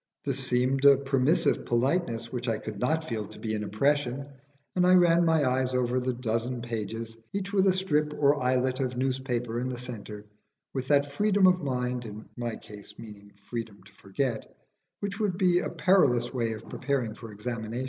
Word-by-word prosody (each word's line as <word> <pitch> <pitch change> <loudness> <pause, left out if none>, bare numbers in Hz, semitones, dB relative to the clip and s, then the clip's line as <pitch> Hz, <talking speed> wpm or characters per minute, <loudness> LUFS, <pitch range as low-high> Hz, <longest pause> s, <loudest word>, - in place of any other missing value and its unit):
This 135 -2 -1
seemed 130 +2 +1
a 140 -1 +8
permissive 135 +3 +2
politeness 120 -2 0
which 125 0 -4
I 115 -2 +1
could 105 -2 -7
not 160 +6 0
feel 110 -3 -3
to 110 - -12
be 110 -1 -3
an 105 -1 -2
oppression, 140 +5 0 0.5
and 180 -1 +3
I 185 - +7
ran 175 -1 +5
my 160 -4 +3
eyes 130 0 0
over 125 0 +1
the 130 0 -1
dozen 120 0 -2
pages, 115 -1 -4 0.2
each 200 0 -3
with 195 -1 +4
a - - +6
strip 150 -5 +1
or 145 0 +3
islet 130 +1 +1
of 130 -2 -2
newspaper 125 -3 -1
in 125 +1 -2
the 125 - -4
centre, 110 -4 -7 0.5
with 130 -1 -3
that 140 0 +3
freedom 200 +4 +3
of 180 -1 +5
mind 125 -3 -2
(in 110 0 -9
my 120 -2 -3
case 105 -1 -12
meaning 100 -2 -12
freedom 105 -2 -7
to 100 +1 -19
forget) 110 +5 -3 0.5
which 200 +1 -4
would 200 -5 0
be 180 -2 +4
a - - -2
perilous 125 -11 +3
way 115 -3 -1
of 110 0 -9
preparing 130 -5 -2
for 115 0 -10
examination. 110 +2 -4
125 Hz, 190 wpm, -28 LUFS, 115-145 Hz, 0.5 s, a